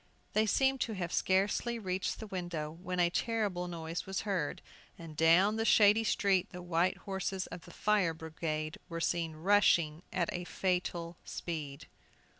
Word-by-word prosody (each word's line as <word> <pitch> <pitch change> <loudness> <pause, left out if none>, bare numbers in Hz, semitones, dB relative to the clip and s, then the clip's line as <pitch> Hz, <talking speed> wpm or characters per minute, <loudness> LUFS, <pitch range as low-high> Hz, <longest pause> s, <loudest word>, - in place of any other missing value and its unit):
They 215 +1 +3
seemed 265 +3 +2
to 225 - 0
have 180 -4 -4
scarcely 200 +5 +1
reached 185 -3 -2
the 220 - -6
window, 175 -6 -4
when 180 +2 -5
a 175 -1 +3
terrible 205 -5 -1
noise 165 0 -5
was 195 0 -2
heard, 190 -8 -2 0.3
and 165 -2 -10
down 175 +7 +5
the 225 - +1
shady 215 0 +6
street 200 -4 +2
the 180 0 -8
white 175 +1 +1
horses 190 -1 -3
of 175 - -9
the - - -12
fire 200 -6 +1
brigade 155 -1 -4
were 165 0 -4
seen 165 -1 0
rushing 170 -3 +3
at 175 -2 -1
a 175 - -3
fatal 175 -2 -2
speed! 150 -4 -5
180 Hz, 160 wpm, -32 LUFS, 165-200 Hz, 0.3 s, shady